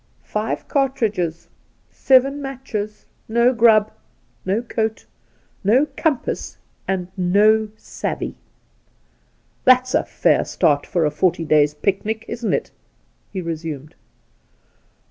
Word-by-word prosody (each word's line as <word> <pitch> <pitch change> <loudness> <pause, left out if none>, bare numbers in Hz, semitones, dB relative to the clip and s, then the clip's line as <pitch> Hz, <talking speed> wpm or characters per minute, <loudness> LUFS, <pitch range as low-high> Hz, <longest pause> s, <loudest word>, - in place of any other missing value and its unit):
Five 215 +1 -3
cartridges, 210 - -1 0.4
seven 275 +2 +3
matches, 245 -6 -5 0.2
no 235 +3 +3
grub, 220 -3 +4 0.6
no 205 +5 0
coat, 220 -2 -2 0.6
no 240 +9 +4
compass, 305 -6 -2 0.3
and 185 -2 -2
no 210 +4 +3
savvey! - - -4 1.3
That's 255 0 +4
a - - +3
fair - - +2
start 145 -2 +1
for 170 -4 +1
a 150 - +1
forty 170 -1 0
days' 150 -1 +3
picnic, 215 +6 -2
isn't 235 -1 -3
it - - -1 0.3
?' - - -41
he 190 - -4
resumed. 160 -3 -5
215 Hz, 105 wpm, -21 LUFS, 175-245 Hz, 1.3 s, grub